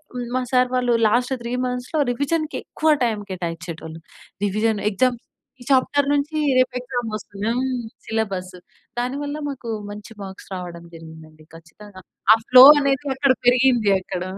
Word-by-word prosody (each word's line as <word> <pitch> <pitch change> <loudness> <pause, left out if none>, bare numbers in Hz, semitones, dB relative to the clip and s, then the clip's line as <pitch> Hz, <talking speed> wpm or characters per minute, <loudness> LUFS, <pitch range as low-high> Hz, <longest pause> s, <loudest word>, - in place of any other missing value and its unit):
హ్మ్, 245 -1 -4
మా 255 - +1
సార్ 250 0 +3
వాళ్ళు 245 -1 +1
లాస్ట్ 245 +4 +1
3 235 +1 -4
మంత్స్‌లో 250 +5 -2
రివిజన్‌కి 310 +5 -2
ఎక్కువ 315 0 0
టైమ్ 215 -3 -2
కేటాయించేటోళ్ళు. 165 -2 -6 0.5
రివిజన్, 215 +1 0
ఎగ్జామ్స్ 240 +4 0 0.4
ఈ - - -9
చాప్టర్ 280 +2 +2
నుంచి 290 +2 -1 0.2
రేపు 255 0 +2
ఎక్సామ్ 245 -2 -4
వస్తుంది. 205 +1 -7
హ్మ్. 260 -1 -1 0.3
సిలబసు 190 -5 -3 0.4
దాని 250 +3 -2
వల్ల 290 +1 -4
మాకు 250 -4 -7 0.2
మంచి 210 +2 -10
మార్క్స్ 190 0 -11
రావడం 175 -2 -8
జరిగింది 160 -1 -12
అండి. 155 0 -20
ఖచ్చితంగా 185 +4 -14 0.3
ఆ - - +6
ఫ్లో 255 0 +10 0.2
అనేది 275 0 0
అక్కడ 270 -1 +3
పెరిగింది 245 -4 +4
అక్కడ 180 -1 -5
235 Hz, 150 wpm, -22 LUFS, 185-255 Hz, 0.5 s, ఫ్లో